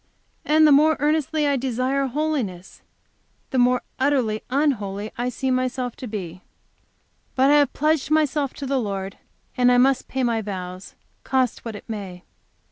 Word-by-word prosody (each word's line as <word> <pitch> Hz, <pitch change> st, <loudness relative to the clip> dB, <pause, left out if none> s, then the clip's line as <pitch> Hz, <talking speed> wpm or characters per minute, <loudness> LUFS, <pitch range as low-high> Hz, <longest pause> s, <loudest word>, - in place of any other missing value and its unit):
And 310 Hz, +1 st, +4 dB
the 300 Hz, -, +6 dB
more 305 Hz, +2 st, +5 dB
earnestly 305 Hz, +1 st, +1 dB
I 285 Hz, -1 st, +2 dB
desire 260 Hz, +2 st, -1 dB
holiness, 255 Hz, -, -3 dB, 0.7 s
the 260 Hz, -, +1 dB
more 250 Hz, 0 st, +3 dB, 0.2 s
utterly 260 Hz, -6 st, +1 dB
unholy 220 Hz, -7 st, -1 dB
I 245 Hz, +1 st, -2 dB
see 260 Hz, +2 st, -2 dB
myself 255 Hz, -1 st, -1 dB
to 255 Hz, -, -7 dB
be. 185 Hz, -5 st, -6 dB, 0.9 s
But 270 Hz, +2 st, +4 dB
I 295 Hz, -, +6 dB
have 290 Hz, -3 st, +2 dB
pledged 305 Hz, -1 st, +1 dB
myself 300 Hz, -3 st, +1 dB
to 280 Hz, -, -6 dB
the 270 Hz, 0 st, 0 dB
Lord, 195 Hz, -3 st, -4 dB, 0.4 s
and 250 Hz, 0 st, +4 dB
I 245 Hz, -, +4 dB
must 265 Hz, +1 st, +3 dB
pay 265 Hz, 0 st, -2 dB
my 230 Hz, -2 st, +1 dB
vows, 185 Hz, -2 st, -7 dB, 0.3 s
cost 260 Hz, -3 st, 0 dB
what 230 Hz, -2 st, -6 dB
it 205 Hz, -, -11 dB
may. 195 Hz, -5 st, -7 dB
255 Hz, 160 wpm, -23 LUFS, 215-280 Hz, 0.9 s, the